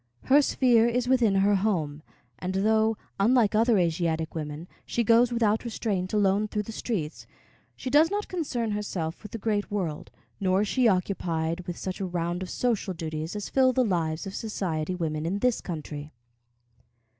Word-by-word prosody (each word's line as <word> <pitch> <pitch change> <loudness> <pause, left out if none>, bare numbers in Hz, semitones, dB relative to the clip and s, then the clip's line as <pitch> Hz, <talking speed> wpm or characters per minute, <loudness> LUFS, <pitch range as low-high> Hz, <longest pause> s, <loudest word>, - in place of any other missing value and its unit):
Her 285 +2 +5
sphere 240 -4 +3
is 245 +1 0
within 245 -6 +3
her 195 +1 +4
home, 170 -8 0 0.4
and 185 +1 -3
though, 220 +2 +2 0.2
unlike 225 +1 +4
other 225 +1 +4
Asiatic 165 -2 0
women, 155 +1 -5 0.2
she 235 - -1
goes 235 +2 +4
without 220 -2 +1
restraint 205 -6 -2
alone 205 0 +2
through 210 0 -2
the 225 - -7
streets, 190 -9 -4 0.5
she 255 - -5
does 305 +4 +6
not 415 +2 -2
concern 265 -11 -2
herself 185 -6 -3
with 210 - -10
the - - -4
great 210 -1 -1
world, 180 -7 -3 0.3
nor 190 -1 +2
is 210 - 0
she 250 +3 +3
occupied 175 -3 -1
with 175 - -4
such 185 -1 -5
a 195 - -2
round 175 0 -2
of 185 - -5
social 220 -6 -1
duties 160 +1 -4
as 205 - -4
fill 260 -1 +3
the 255 0 +2
lives 165 -5 -1
of 195 - -6
society 185 -6 -2
women 155 -3 -2
in 175 +5 -1
this 250 +2 +1
country. 150 -3 -6
200 Hz, 175 wpm, -27 LUFS, 170-230 Hz, 0.5 s, does